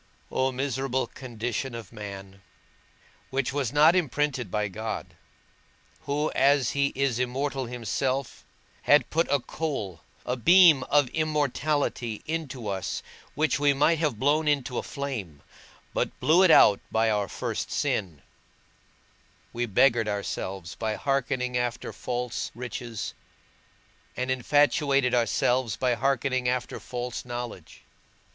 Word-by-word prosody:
O 130 0 +1
miserable 130 0 -1
condition 120 0 -5
of 115 -4 -8
man! 100 -2 -9 0.9
which 135 0 -1
was 140 -5 -1
not 155 +4 +6
imprinted 145 - 0
by 105 +2 -1
God, 110 +3 -5 0.9
who, 150 +2 0
as 140 -2 +3
he 140 0 +2
is 135 -3 0
immortal 130 +1 -2
himself, 125 +3 -2 0.4
had 145 +1 +4
put 165 +2 +2
a 140 - +3
coal, 120 - -4 0.2
a 125 - -1
beam 170 +2 +7
of 145 -2 +3
immortality 145 -6 -1
into 145 -8 -4
us, 95 -2 -3 0.3
which 155 0 +1
we 145 -1 +3
might 155 +3 +3
have 150 -9 0
blown 150 +6 +2
into 140 -4 0
a - - -2
flame, 110 - -6 0.5
but - - -2
blew 165 +4 +4
it 190 - +6
out 105 -10 +7
by 110 0 +2
our 105 -1 0
first - - -4
sin; 85 -9 -2 1.3
we 120 +1 -1
beggared 115 +1 +3
ourselves 95 -3 -4
by 110 -1 -2
hearkening 130 -2 -1
after 125 0 -2
false 125 -1 -3
riches, 120 -2 -5 1.0
and 125 +1 -1
infatuated 140 0 +2
ourselves 120 0 +1
by 125 -1 +1
hearkening 130 -1 0
after 125 0 -2
false 125 -1 -5
knowledge. 120 -8 -7
125 Hz, 125 wpm, -27 LUFS, 115-140 Hz, 1.3 s, beam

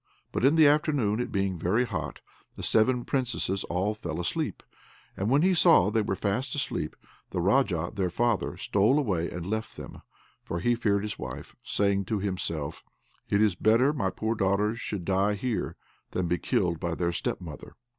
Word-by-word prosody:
But - - -2
in 140 +4 +5
the 160 -1 +7
afternoon, 145 -7 +3
it 125 - -2
being 95 -3 -1
very 105 +9 +2
hot, - - -5 0.3
the - - -8
seven 120 +2 +3
Princesses 125 -7 -1
all 95 +5 0
fell 85 -6 -5
asleep, 90 - -2 0.5
and 100 +3 -1
when 140 +5 +4
he 190 +1 +4
saw 105 - +5
they 110 0 +2
were 100 -2 -1
fast 120 +9 -1
asleep, 135 - -3 0.3
the - - -3
Raja, 90 -4 +2
their 95 -4 0
father, 120 +4 0
stole 105 +8 +2
away 95 - 0
and 85 -1 -6
left 110 +3 -3
them - - -9 0.4
(for 85 - -3
he 120 +8 +2
feared 100 -4 +1
his 105 -1 -4
wife), 65 -1 -7
saying 100 -1 +1
to 110 - -1
himself: 90 -6 -3 0.5
"It 100 +1 +3
is 105 -3 +3
better 115 +10 +3
my 110 -10 0
poor 110 +4 -2
daughters 105 +2 +1
should 95 -5 -4
die 100 +2 +2
here, 115 +2 -2 0.4
than 90 -1 0
be 90 0 0
killed 85 +2 0
by 85 -2 -2
their 85 0 0
step 85 - -2
mother." 80 -6 -10
100 Hz, 185 wpm, -28 LUFS, 90-120 Hz, 0.5 s, the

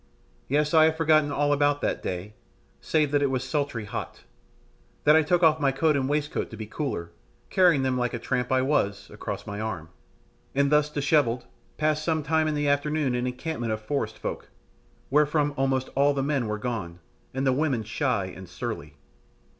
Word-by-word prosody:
Yes, 150 +3 +1
I 160 -1 +7
have 160 0 +1
forgotten 155 -2 +3
all 145 0 +2
about 145 0 +2
that - - -1
day, 95 +3 -4 0.5
save 150 -3 +1
that 145 -1 +2
it 140 - +2
was 130 -1 -1
sultry 135 -4 -2
hot, 105 - -6 0.8
that 150 +1 +6
I 160 - +6
took 175 +3 +1
off 160 -1 +5
my 140 -2 +2
coat 150 +3 +2
and 135 -1 0
waistcoat 150 0 -1
to 110 - -9
be 110 - -5
cooler, 105 - -4 0.4
carrying 175 -7 +4
them, 130 -1 0
like 125 0 0
the - - -1
tramp 125 +1 -2
I 130 0 +3
was, 100 -8 0
across 105 -1 -6
my 100 -1 -5
arm, 95 -7 -4 0.7
and 140 +1 +2
thus 150 0 +4
dishevelled 140 -5 +1 0.3
passed 155 0 +1
some 160 -1 0
time 160 +2 +2
in 155 - 0
the 145 0 0
afternoon 145 -1 +1
an 125 0 -1
encampment 125 -3 -3
of 110 - -3
forest 110 -1 -3
folk, - - -5 0.6
wherefrom 150 0 +3
almost 135 -1 0
all 140 +1 +3
the 135 - 0
men 140 -4 0
were 105 0 -2
gone, 105 -7 -4 0.3
and 135 +1 -2
the 130 - +3
women 135 -5 0
shy 115 -1 -1
and 95 0 -9
surly. 70 +1 -6
140 Hz, 190 wpm, -26 LUFS, 115-150 Hz, 0.8 s, I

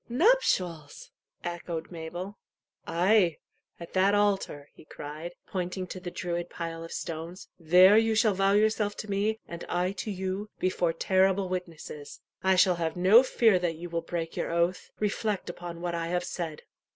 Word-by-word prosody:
"Nuptials!" 235 - +1 0.3
echoed 170 -1 -5
Mabel. 175 +4 -7 0.5
"Ay, 180 -1 +3 0.4
at 170 - -10
that 195 +2 +4
altar," 195 -8 0
he - - -16
cried, 155 +3 -8
pointing 185 0 -3
to 185 - -7
the 180 -1 -6
Druid 175 -1 -3
pile 165 -1 -5
of 165 - -9
stones; 165 +3 -6
"there 180 +5 +7
you 225 0 +1
shall 215 -1 +4
vow 195 +1 +2
yourself 210 0 +2
to 215 - -6
me 210 +3 +1
and 170 0 -7
I 180 +1 0
to 200 +2 -5
you, 190 +1 -3
before 180 -2 +1
terrible 190 +2 +2
witnesses. 165 -5 -6 0.2
I 190 0 +4
shall 180 -1 +4
have 165 0 -2
no 190 +7 +7
fear 225 -6 +3
that 175 -2 -1
you 170 +2 -8
will 170 0 -1
break 165 0 -4
your - - -2
oath. 170 +2 0
Reflect 210 -2 -1
upon 175 -1 -8
what 175 -1 -2
I 165 -1 -2
have 180 +1 -1
said." 165 -4 -5
180 Hz, 165 wpm, -28 LUFS, 170-200 Hz, 0.5 s, there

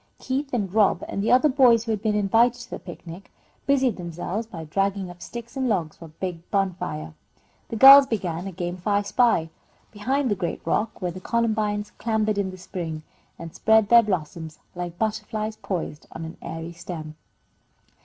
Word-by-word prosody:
Keith 270 +2 -3
and 200 -7 -2
Rob, 210 -2 +3
and 200 - -3
the 215 - +1
other 255 +4 +6
boys 255 -5 +5
who 230 - -3
had 215 -2 -1
been 215 -1 0
invited 225 +4 +3
to 245 - -11
the - - -5
picnic, 175 +1 -10 0.4
busied 265 -5 +2
themselves 175 +5 -4
by 170 -8 -8
dragging 195 +3 -1
up 175 0 -15
sticks 235 +6 -8
and 260 -2 0
logs 170 -8 -1
for 170 - -11
a 155 -1 -15
big 175 -3 -5
bonfire. 180 - -2 0.6
The - - -4
girls 275 +4 +10
began 180 -5 -3
a - - -5
game 175 -1 -4
of 180 - -10
"I 205 0 +2
spy" 200 -7 +2 0.4
behind 255 +4 -1
the - - +2
great 170 -3 -4
rock 215 -2 -1
where 180 - -1
the 185 +2 -9
columbines 215 -2 0
clambered 215 -2 0
in 195 -2 0
the 185 - -9
spring, 165 -4 -6 0.3
and 165 -1 -9
spread 220 -2 +3
their 235 0 +8
blossoms 165 -5 -4 0.2
like 175 -1 -6
butterflies 215 0 -2
poised 170 -5 -5
on 165 - -7
an 160 - -9
airy 165 +1 -6
stem. 165 -3 -7
200 Hz, 185 wpm, -24 LUFS, 175-225 Hz, 0.6 s, girls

